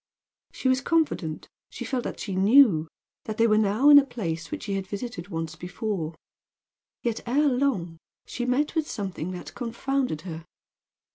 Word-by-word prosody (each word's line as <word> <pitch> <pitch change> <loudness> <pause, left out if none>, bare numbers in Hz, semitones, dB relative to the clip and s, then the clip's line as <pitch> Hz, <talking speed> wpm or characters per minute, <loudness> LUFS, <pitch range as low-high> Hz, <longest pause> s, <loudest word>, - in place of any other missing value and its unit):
She - - -3
was 260 0 +3
confident 275 - 0 0.2
she - - -7
felt 255 -3 -2
that - - -5
she 200 - -4
knew 195 - +5 0.4
that 215 -1 -4
they 230 - +4
were 215 -2 +4
now 215 +7 +4
in 285 - +11
a - - +2
place 180 -11 -4
which 305 0 -5
she 200 - -3
had 195 -1 -3
visited 205 -3 -5
once 165 -4 -4
before; 180 -1 -4 0.9
yet, 235 -2 -1
ere 290 +5 +3
long, 245 - 0 0.3
she 245 - -4
met 280 +4 +1
with 320 -2 -1
something 190 -5 -4
that 180 - -8
confounded 245 - -2
her. 165 -2 -7
215 Hz, 165 wpm, -26 LUFS, 175-260 Hz, 0.9 s, in